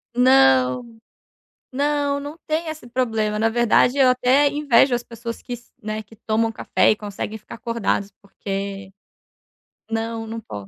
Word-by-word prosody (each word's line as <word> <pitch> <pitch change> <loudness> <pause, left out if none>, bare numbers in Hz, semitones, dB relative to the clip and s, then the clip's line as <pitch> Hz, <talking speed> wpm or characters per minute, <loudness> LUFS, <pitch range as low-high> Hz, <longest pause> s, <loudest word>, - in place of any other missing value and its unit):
Não. 135 - +3 0.8
Não, 285 0 0
não 290 +3 -8
tem 315 +2 -1
esse 310 -4 -7
problema, 225 -4 -1
na 225 - +3
verdade 240 +3 +3
eu 270 -2 +6
até 255 +3 +4
invejo 280 -3 +3
as 240 - 0
pessoas 230 0 -8
que 245 - -7
s 240 0 -10
né, 215 0 -4
que 220 +2 -18
tomam 225 +1 0
café - - +2
e - - +2
conseguem 210 +1 -6
ficar 220 - -10
acordadas, 230 -4 -2
porque 195 -1 -6 1.0
Não, 225 0 -3
não 225 +1 -6
po 105 - -9
230 Hz, 150 wpm, -22 LUFS, 210-255 Hz, 1.0 s, eu